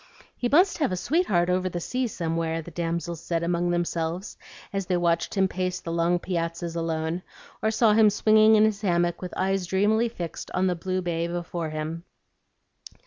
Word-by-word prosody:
"He 245 - -1
must 355 +8 +4
have 290 -10 +1
a 185 - -1
sweetheart 200 - +1
over 185 +1 +1
the 175 - -4
sea 250 +8 -1
somewhere," 165 -4 -2
the 175 - -10
damsels 170 0 -3
said 170 0 -2
among 175 +1 0
themselves, 175 +2 -2 0.4
as 195 -2 -2
they 180 - +1
watched 170 +1 0
him 190 0 +4
pace 185 0 -2
the 165 - -6
long 170 +1 +2
piazzas 170 -1 -3
alone, 165 +1 -2 0.4
or 220 - +2
saw 220 0 +4
him 215 0 +6
swinging 215 +1 +5
in 215 0 +6
his 215 -1 0
hammock 175 -3 +1
with 180 - -5
eyes 190 -1 0
dreamily 215 +5 +2
fixed 175 -8 -6
on 185 - +2
the 185 - +2
blue 185 +2 -2
bay 170 -1 -1
before 170 -1 -4
him. 155 +2 -4
175 Hz, 185 wpm, -26 LUFS, 170-195 Hz, 0.4 s, him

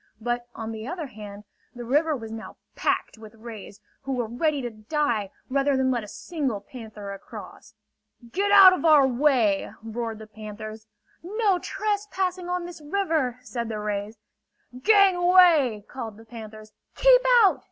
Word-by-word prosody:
But, 240 +1 -3
on 225 0 -5
the 220 +1 -7
other 340 0 -4
hand, 210 -4 -10 0.3
the 240 -1 -7
river 300 +5 +2
was 225 -2 -8
now 225 0 -8 0.2
packed - - -1
with 220 0 -13
rays, 220 -3 -10 0.2
who 270 0 -4
were 245 -2 -1
ready 285 +6 -1
to 240 - -4
die, 220 -2 -1 0.2
rather 275 +1 +1
than 260 0 +2
let 240 -3 -1
a - - -9
single 270 - -3
panther 210 -2 -9
across. 195 - -11 0.6
"Get 400 +6 0
out 390 -2 +10
of 365 - -3
our 305 -4 +6
way!" 250 -6 +2
roared 225 0 -4
the 220 - -10
panthers. 215 0 -9 0.3
"No 400 +1 0
trespassing 385 -3 -2
on 360 -1 -2
this 345 -3 -10
river!" 310 -6 -1
said 235 -2 -4
the 220 - -3
rays. 210 +1 -4 0.6
"Gangway!" 355 - +4
called 225 -5 -7
the 225 - -15
panthers. 215 -2 -11 0.2
"Keep - - +6 0.2
out!" 390 - +4
245 Hz, 155 wpm, -25 LUFS, 220-335 Hz, 0.6 s, out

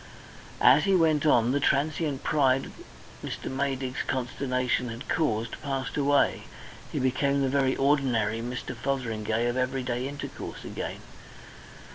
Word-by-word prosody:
As 145 +6 +6
he 195 -1 +3
went 155 -3 +3
on, 120 -4 +4
the 140 - +1
transient 145 0 0
pride 135 -3 +2 0.5
Mr. - - -5
Maydig's 135 -1 -2
consternation 125 -1 -1
had 115 +3 -7
caused 115 -7 -1
passed 135 -2 -3
away; 145 -1 +2 0.5
he - - -4
became 140 +2 +1
the 135 - +1
very 135 -1 +2
ordinary 125 -6 +1
Mr. 125 +1 -5
Fotheringay 115 -3 -1
of 120 +1 -1
everyday 130 -1 -1
intercourse 140 0 -7
again. - - -5
130 Hz, 125 wpm, -27 LUFS, 125-140 Hz, 0.5 s, As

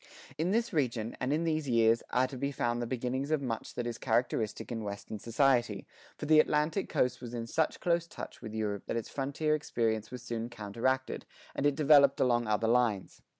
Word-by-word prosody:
"[68:1] - - -19
In 165 +3 +1
this 230 0 0
region, 120 -7 -1
and 130 +1 -1
in 155 +3 +1
these 155 -3 -1
years, 115 -1 +4
are 125 +1 +2
to 130 - -7
be 140 +2 -2
found 120 -2 -1
the 120 - -2
beginnings 130 +3 -2
of 155 -1 +2
much 125 -5 -4
that 120 - -2
is 120 -1 -4
characteristic 115 -3 -1
in 115 -2 -3
Western 105 +1 -6
society, 120 -3 +1 0.3
for - - -5
the 155 0 +6
Atlantic 155 +5 +1
coast 125 -1 0
was 120 -1 -6
in 115 -1 -3
such 155 +7 0
close 170 -1 +1
touch - - -9
with 110 -3 -7
Europe 105 -2 -3
that - - -1
its 115 - -4
frontier 145 +3 -1
experience 115 -7 -1
was 125 -1 -8
soon 115 -1 -4
counteracted, 120 +4 -2 0.3
and 145 - +1
it 145 - +1
developed 140 -2 +5
along 120 -3 +2
other 110 +1 +1
lines. 115 -5 +1
125 Hz, 205 wpm, -31 LUFS, 115-145 Hz, 0.3 s, the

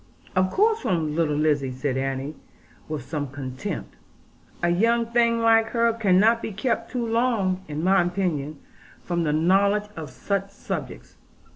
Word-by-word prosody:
'Of 185 0 +3
course 440 - +2
from 160 - -1
little 160 -3 +1
Lizzie,' 145 -3 +1
said 130 +1 -2
Annie, 135 +2 -2 0.6
with 155 -5 -4
some 145 -1 -3
contempt; 130 -1 -6 0.7
'a 175 - +3
young 230 +6 +2
thing 235 0 +2
like 225 0 +5
her 230 -1 +3
cannot 220 +1 +3
be - - -4
kept 230 +3 -2
too 245 -2 -2
long, 225 -5 +1
in 150 +1 -4
my 190 +1 +4
opinion, 175 -5 -2 0.5
from 170 -2 -1
the 150 - +1
knowledge 200 +6 +2
of 155 -5 -6
such 195 +6 -2
subjects. 200 - -7
185 Hz, 150 wpm, -24 LUFS, 150-225 Hz, 0.7 s, like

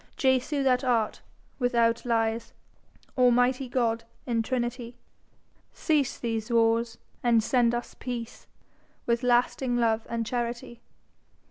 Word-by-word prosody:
Jesu, 265 +1 +1
that 255 -1 +2
art, 235 -4 0 0.4
without 235 -2 +1
lies, 230 -1 -1 0.6
Almighty 250 +1 +3
God 230 -2 0 0.2
in 235 -2 0
trinity, 240 0 -3 0.8
Cease 300 -5 0
these 225 -2 -3
wars, 230 0 +2 0.2
and 235 -2 +3
send 240 0 +2
us 240 - -5
peace 240 -2 -6 0.6
With 235 0 +1
lasting 245 0 +1
love 225 -2 +1
and 230 -1 -2
charity. 235 0 -4
240 Hz, 110 wpm, -27 LUFS, 230-250 Hz, 0.8 s, Almighty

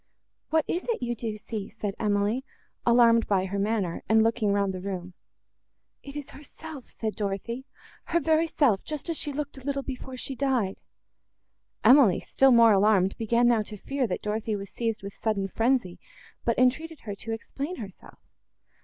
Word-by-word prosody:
"What 315 -1 +2
is 350 - -1
it 470 - -2
you 240 0 -1
do 220 -2 -4
see?" 210 -1 -6
said 210 -2 -4
Emily, 210 +4 +1 0.4
alarmed 235 -1 +5
by 190 -2 +2
her 200 +1 -3
manner, 200 -4 -1
and 220 0 +5
looking 225 -2 +1
round 200 -1 +1
the 185 - -5
room. 185 -2 -5 0.9
"It 280 0 -10
is 290 -2 -6
herself," 295 -1 -10
said 220 -1 -4
Dorothée, 215 +5 -3 0.4
"her 340 - +1
very 320 0 +2
self! 250 -11 +2
just 305 +2 -4
as 325 - -2
she 295 - -2
looked 285 -1 -5
a - - -14
little 275 0 -2
before 260 -1 -6
she 270 - -3
died!" 250 -7 0 1.1
Emily, 250 -9 +7
still 270 0 +3
more 230 -2 +7
alarmed, 195 -1 +3
began 235 +2 +3
now 235 -2 +4
to 210 0 -8
fear, 275 +4 -2
that 185 - -4
Dorothée 215 0 -1
was 195 -1 -8
seized 225 -2 -2
with 200 0 -6
sudden 205 -3 -1
frenzy, 225 -3 0 0.5
but 235 - +1
entreated 285 +5 +1
her 205 - -5
to 225 - -6
explain 280 +9 -4
herself. 200 - -10
230 Hz, 175 wpm, -27 LUFS, 205-270 Hz, 1.1 s, Emily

